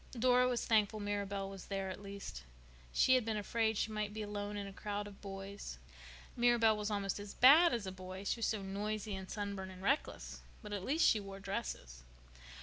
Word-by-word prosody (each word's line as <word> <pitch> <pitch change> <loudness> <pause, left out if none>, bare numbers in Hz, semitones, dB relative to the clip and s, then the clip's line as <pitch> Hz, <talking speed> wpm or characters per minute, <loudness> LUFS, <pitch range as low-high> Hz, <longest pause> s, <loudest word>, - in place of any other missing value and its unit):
Dora 250 +1 +5
was 245 -1 0
thankful 215 -1 +3
Mirabel 200 -1 -2
was 195 -1 -8
there, 195 -1 -2
at 185 - -8
least. 200 0 -7 0.5
She 260 - +4
had 255 -2 +4
been 220 -1 -1
afraid 220 +1 0
she 220 - 0
would 210 -1 -3
be 215 - -3
alone 205 0 -4
in 200 - -3
a 195 - -8
crowd 205 0 -3
of 205 -1 -11
boys. 195 0 -7 0.6
Mirabel 240 -3 +4
was 210 0 -2
almost 200 -1 -1
as 205 0 -8
bad 310 +7 +8
as 230 -4 -1
a 190 - -3
boy—she 185 +4 -4
was 230 - +1
so 210 -3 -1
noisy 205 +2 -3
and 190 -1 -6
sunburned 200 -2 -4
and 185 0 -11
reckless. 275 +8 -1 0.2
But 210 -1 -6
at 200 -2 -3
least 300 +10 +2
she 220 - +4
wore 195 -1 -8
dresses. 195 - -5
205 Hz, 200 wpm, -35 LUFS, 195-220 Hz, 0.6 s, bad